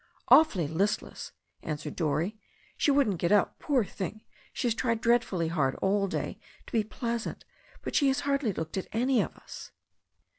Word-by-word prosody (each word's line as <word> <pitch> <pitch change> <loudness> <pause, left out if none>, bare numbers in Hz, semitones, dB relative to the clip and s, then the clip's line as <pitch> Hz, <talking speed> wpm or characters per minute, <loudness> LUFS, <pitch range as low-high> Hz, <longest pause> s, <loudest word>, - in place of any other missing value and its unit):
"Awfully 210 - +6
listless/' 190 +7 -2 0.3
answered 150 -1 -5
Dorrie. 160 +5 0 0.4
"She - - +1
wouldn't 270 - +3
get 170 - +1
up. 205 -1 +3
Poor 265 -7 +1
thing, 200 +3 -6 0.3
she - - -3
has 235 - +2
tried 230 -1 0
dreadfully 225 -8 +2
hard 140 -5 +1
all 195 +1 +1
day - - -3 0.3
to - - -13
be 225 -2 +3
pleasant. 230 +2 -4 0.4
But - - -4
she 285 - +4
has 270 +1 +2
hardly 275 -5 +1
looked 160 -1 -4
at 190 - -3
any 250 +3 +3
of - - -4
us." - - -10
210 Hz, 170 wpm, -29 LUFS, 170-245 Hz, 0.4 s, Awfully